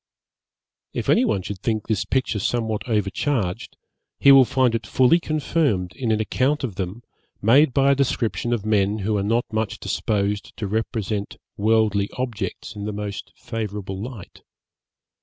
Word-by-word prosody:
If - - -3
any 235 - +4
one 95 - 0
should 100 0 -6
think 110 0 -1
this 110 -4 -1
picture 130 -5 0
somewhat 110 +1 -1
overcharged, 105 -1 -1 0.4
he 140 - +7
will 135 -1 +8
find 125 -1 +2
it 115 -3 -2
fully 130 +7 +4
confirmed 145 - 0
in 120 -4 -1
an 110 - +2
account 135 +7 0
of 120 -6 -2
them 95 +5 -5 0.4
made 130 +7 +5
by 140 +1 +3
a - - +4
description 120 -3 0
of 115 -4 -1
men 105 -1 +2
who 110 0 +1
are - - 0
not 115 +4 +1
much 110 -2 -2
disposed 105 -1 -2
to 110 - -3
represent 105 -1 -2 0.2
worldly 105 -2 +2
objects 110 -3 -4
in 100 0 -5
the 105 - -2
most 100 -2 -5
favourable 105 -3 -5
light. 115 -5 -9
110 Hz, 160 wpm, -23 LUFS, 100-125 Hz, 0.4 s, will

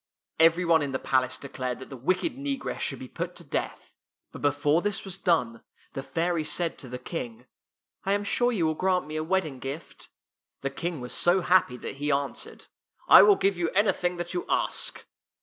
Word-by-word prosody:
Every 165 +2 +5
one 165 -2 +4
in 140 -2 -3
the - - +1
palace 130 -1 +1
declared 130 -2 -4
that 130 - -11
the - - -6
wicked 185 - 0
negress 275 -1 -4
should - - -2
be - - -8
put - - -5
to - - -8
death, - - -4 0.4
but - - -10
before 145 +3 +2
this 205 +1 -1
was 190 0 -5
done, 125 - +1 0.3
the 135 - -4
fairy 165 +4 -1
said 165 +2 0
to 130 - -7
the 125 - -5
King, 125 -3 -6 0.3
" - - -58
I 195 - +1
am 205 0 0
sure 245 +4 +2
you 190 -9 0
will 155 - +1
grant 185 +2 +1
me 155 +1 -7
a 155 - -1
wed 190 +3 +1
ding 140 -5 -7
gift." 140 +5 -7 0.5
The 135 - -2
King 165 0 -4
was 125 - -6
so 180 +2 +3
happy 175 -8 +3
that 135 - -6
he 145 +1 0
answered, 140 0 -3 0.2
" - - -33
I - - +11
will 410 - +7
give 195 - +1
you 170 -1 +1
anything 180 -3 +2
that 175 - -4
you 355 - -2
ask." - - -1
165 Hz, 215 wpm, -27 LUFS, 135-185 Hz, 0.5 s, I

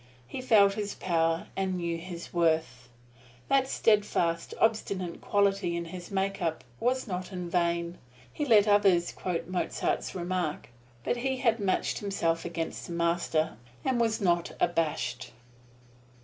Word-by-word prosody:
He 130 - -5
felt 205 -6 +5
his 205 -1 -4
power, 165 -2 +1
and 190 -1 -1
knew 170 -1 -2
his 170 0 -8
worth. 160 -7 +1 0.6
That 270 -1 +3
steadfast, 205 -9 +1
obstinate 200 -5 0
quality 195 -3 +1
in 170 - -3
his 175 +1 -8
make 195 0 -1
up 160 -1 -1 0.2
was 255 +2 +1
not 185 -3 -4
in 180 -2 -4
vain. 170 0 0 0.3
He - - -2
let 220 -6 +5
others 195 -4 +4
quote 170 -2 -3
Mozart's 185 +1 -1
remark; 175 -5 -2 0.3
but 245 - 0
he 265 +2 -1
had 230 -3 +2
matched 195 -2 0
himself 170 -5 -1
against 165 -1 -4
the 175 - -6
Master, 170 -4 0 0.3
and 255 -3 +2
was 225 -1 +1
not 175 -4 +1
abashed. 150 -9 -1
180 Hz, 140 wpm, -29 LUFS, 170-205 Hz, 0.6 s, felt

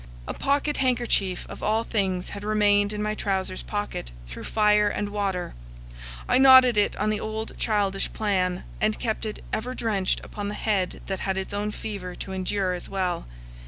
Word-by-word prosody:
A - - -2
pocket 285 +2 0
handkerchief 240 -8 +1
of - - -9
all 220 +2 +1
things 190 -5 -1
had 200 0 -7
remained 205 -1 +3
in 210 0 -3
my 215 0 0
trousers 190 -3 -2
pocket 205 - -4 0.2
through - - -8
fire 210 -1 +4
and 205 0 -2
water; 195 -3 -2 0.7
I - - +4
knotted 260 -2 +8
it 205 -1 +2
on 215 +1 0
the 215 - -1
old 220 +1 -4
childish 200 -3 +1
plan, 185 -4 0 0.2
and 215 0 +2
kept 220 -1 -1
it 215 - -6
ever 250 +3 -2
drenched 200 -5 0
upon 205 -1 -5
the 205 - -3
head 200 -4 -1
that 190 -1 -3
had 190 -1 -1
its 190 +1 -4
own 205 +1 -1
fever 200 -4 -5
to 190 - -6
endure 190 0 -1
as 180 - -6
well. 185 -3 -1
205 Hz, 180 wpm, -26 LUFS, 190-215 Hz, 0.7 s, knotted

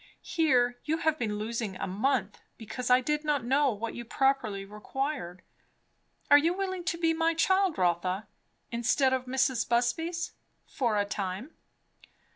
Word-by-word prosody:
Here 250 -7 +2
you 315 +1 0
have 315 -1 0
been 210 -4 -1
losing 220 -2 -3
a - - -3
month, 210 +1 -1 0.2
because 245 +3 -5
I 250 +1 +6
did 300 +3 -1
not 290 -5 0
know 275 +2 +3
what 225 +1 -4
you 240 - -6
properly 235 -5 0
required. 210 - -4 0.9
Are 290 - +10
you 335 +4 +1
willing 375 -2 -3
to 335 0 -1
be 330 -1 +2
my 325 0 +1
child, 375 +1 +2
Rotha? 180 +3 0 0.4
instead 245 +3 +2
of 260 -1 -1
Mrs. 260 -2 +1
Busby's? 325 +9 0 0.3
for 235 -5 -1
a 205 - +2
time?" 200 - -4
250 Hz, 150 wpm, -29 LUFS, 215-305 Hz, 0.9 s, Are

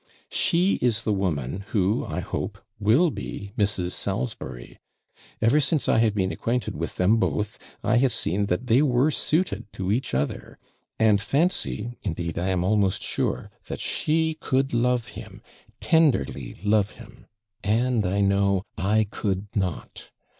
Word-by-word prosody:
'She 180 +2 +2
is 120 -2 +1
the 110 - +1
woman 90 -3 -2
who, 100 -1 +1
I - - -3
hope, - - -4 0.2
will 120 - +4
be 100 -6 -6
Mrs. 100 -5 0
Salisbury. 100 - -4 0.6
Ever 115 +7 +4
since 145 +1 +1
I - - +4
have 110 -2 +2
been 95 -2 +1
acquainted 125 +2 -2
with 85 +3 -4
them 95 +5 +3
both, 105 -2 -1 0.2
I - - +3
have 130 +1 +3
seen 100 -3 0
that 90 +8 -1
they 125 +2 +4
were 135 +1 +3
suited 160 - 0
to 95 0 -2
each 125 - -1
other; 70 +2 -3 0.4
and 105 -2 +4
fancy, 135 - -1
indeed 85 -3 -3
I 90 - -1
am 90 -2 +1
almost 100 -1 +1
sure, - - -2
that - - -5
she 160 +1 0
could 135 0 0
love 120 0 +1
him, - - -10 0.4
tenderly 150 - +1
love 105 -1 +3
him - - -14 0.4
and, 115 +2 +2
I 100 +2 0
know, 100 -1 +2 0.2
I 105 +3 +2
could 100 -1 -2
not. 95 -6 -3
105 Hz, 150 wpm, -25 LUFS, 95-125 Hz, 0.6 s, will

